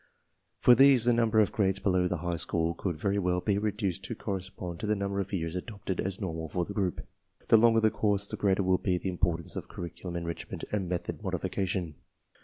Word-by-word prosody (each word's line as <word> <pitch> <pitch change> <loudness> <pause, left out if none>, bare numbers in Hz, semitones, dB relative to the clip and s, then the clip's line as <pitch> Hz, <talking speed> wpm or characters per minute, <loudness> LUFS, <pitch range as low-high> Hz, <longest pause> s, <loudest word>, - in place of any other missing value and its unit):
For 125 - +6
these 135 -1 +6
the 120 - +5
num 115 -1 +2
ber 110 0 +4
of 105 - +1
grades 95 -2 +1
below 90 -2 +1
the 90 - -1
high 85 -1 -1
school 85 +1 0
could 85 -1 -3
very 100 +5 0
well 90 -1 +1
be 100 +2 0
reduced 105 -4 -2
to - - -5
correspond 95 -3 -5
to - - -3
the 105 - +2
number 100 0 -2
of 100 0 -3
years 85 -3 -2
adopted 100 -1 -5
as 95 0 -2
normal 80 -5 -4
for 90 +3 -1
the 100 - -7
group. 95 -4 -1 0.5
The 115 - +8
longer 115 0 +5
the 110 -1 +4
course 100 -1 +1
the - - -5
greater 100 -1 +1
will 95 0 +2
be 90 -2 0
the 95 - -3
importance 85 -2 -1
of - - -6
curriculum 85 0 -7
enrich 85 -1 -4
jment - - -6
and 95 -4 -1
method 90 -1 -3
modification. 90 -6 -2
95 Hz, 220 wpm, -29 LUFS, 90-105 Hz, 0.5 s, The